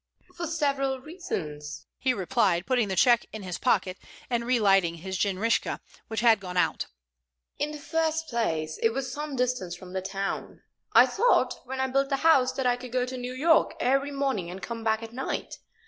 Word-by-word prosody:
"For 340 -1 -4
several 275 -4 0
reasons," 185 - -6
he 260 - +2
replied, 195 -5 +1
putting 245 -3 +2
the 190 - -2
check 235 +4 +4
in 220 -1 -7
his 180 -2 -5
pocket, 190 -6 +1 0.3
and 235 -1 0
relighting 195 -8 +3
his 190 +3 -6
jinrikisha, 200 +4 0 0.3
which 220 -1 -2
had 230 -3 +5
gone 180 -2 -6
out. - - +1 0.7
"In 290 - 0
the 300 - -6
first 320 +1 -1
place, 160 - -1
it 225 0 +3
was 265 +1 -3
some 295 -1 -4
distance 250 -9 -1
from 180 +1 -11
town. 195 +1 -4 0.3
I - - +8
thought, 480 +4 +2
when 265 +1 -5
I 265 - +2
built 275 +1 +1
the 275 - +1
house, 265 -6 +5
that 265 - -2
I 245 0 +3
could 250 -1 -9
go 250 0 +1
to 255 +1 -6
New 250 0 -5
York 320 +5 +3
every 275 +3 +2
morning 270 -11 -1
and 185 +2 -7
come 230 +2 -6
back 220 0 +1
at 225 0 -9
night. 265 +2 -4
245 Hz, 190 wpm, -27 LUFS, 195-270 Hz, 0.7 s, I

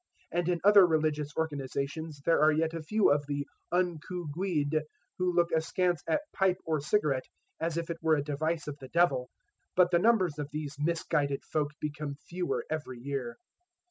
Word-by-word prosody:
And 175 0 0
in 175 -1 +1
other 200 -2 +8
religious 155 -2 +1
organizations 145 0 -3
there 165 - +4
are 155 +1 +6
yet 160 +1 +1
a 165 - -4
few 210 +5 +3
of 145 0 +3
the 145 0 -2 0.3
"unco' 175 0 -1
guid" 155 -4 0 0.4
who 180 0 +2
look 175 -1 +2
askance 170 +1 +1
at 165 - +2
pipe 190 -2 +2
or 155 -2 0
cigarette 150 -5 +1 0.3
as 165 0 -1
if 170 0 -2
it 165 - -6
were 160 -1 +4
a 145 - -1
device 155 +2 -2
of 145 -1 -6
the 130 - -9
devil. 140 -8 +2 0.5
But 180 -1 +5
the 170 - +4
numbers 185 -8 +3
of 145 -1 -3
these 150 -1 -5
misguided 145 -3 0
folk 150 -1 -1
become 150 -1 -4
fewer 175 +4 -3
every 150 -5 -4
year. 125 -2 -4
160 Hz, 175 wpm, -30 LUFS, 145-175 Hz, 0.5 s, other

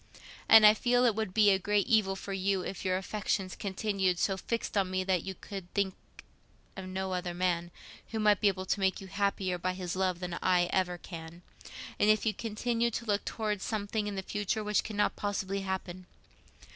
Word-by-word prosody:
And 225 -1 +9
I 210 - +9
feel 245 +2 +2
it 235 - +4
would 220 -2 -2
be 210 +1 +5
a 190 - +3
great 205 +1 +1
evil 215 -6 +3
for 195 +1 -6
you 195 0 0
if 190 - -6
your 185 -1 +1
affections 195 -1 -2
continued 195 -2 -1
so 195 +2 +1
fixed 225 +4 -3
on 195 -2 +2
me 185 0 -1
that 185 -2 +1
you 190 +2 -6
could 190 -3 -8
think 195 -2 +1 0.8
of 190 -1 -7
no 190 0 -3
other 180 -1 -3
man 175 -1 0 0.4
who 220 - -4
might 210 -2 +3
be 210 - +4
able 190 -1 0
to 200 - 0
make 190 -1 +1
you 195 - -9
happier 195 -2 -1
by 185 +1 -1
his 180 -2 -4
love 185 -2 0
than 180 -1 -4
I 180 -1 +3
ever 180 -2 +1
can, 170 0 -10 0.6
and 210 - +4
if 215 +1 +3
you 220 - +2
continued 230 +1 -1
to 235 - -4
look 205 -2 0
towards 210 -3 -2
something 210 0 -2
in 205 - -4
the 190 - -3
future 210 +2 -2
which 210 0 +1
cannot 210 -1 0
possibly 200 -1 -2
happen. 185 -1 -5
195 Hz, 205 wpm, -30 LUFS, 185-210 Hz, 0.8 s, And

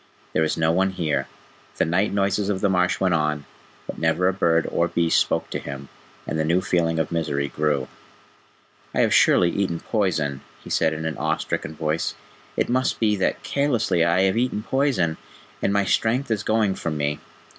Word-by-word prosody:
"There 80 - +2
is 80 - -1
no 80 0 +2
one 95 +3 +2
here." 75 -6 -1 0.5
The - - +2
night 90 +6 +1
noises 100 0 0
of 100 -2 0
the 100 - +2
marsh 90 -1 +1
went 95 -2 +2
on, 75 -3 0 0.4
but - - -7
never 80 +3 +2
a 95 - +2
bird 85 -3 +2
or 85 - +1
beast 85 -1 +2
spoke - - -1
to - - -2
him, 70 -1 -8 0.4
and 80 - -3
the - - +2
new 85 +3 +2
feeling 85 -3 0
of 80 - -1
misery 75 -4 -1
grew. 75 -2 0 1.1
"I - - +3
have - - +3
surely 85 -1 +5
eaten 95 -4 -1
poison," 80 - -1 0.2
he - - -10
said 80 - +2
in 80 +1 -5
an 80 -2 -3
awe - - 0
stricken 80 - -4
voice. 80 +1 -1 0.4
"It - - +1
must 130 +1 0
be 105 -2 +2
that 95 - -1
carelessly 120 - +1
I 85 +2 +3
have 95 +3 +2
eaten 120 -3 0
poison, 130 - +1 0.4
and - - +1
my 100 0 +2
strength 115 +6 +1
is 105 -3 +1
going 110 -3 +1
from 80 -4 -4
me. 75 0 -1
85 Hz, 195 wpm, -23 LUFS, 80-100 Hz, 1.1 s, surely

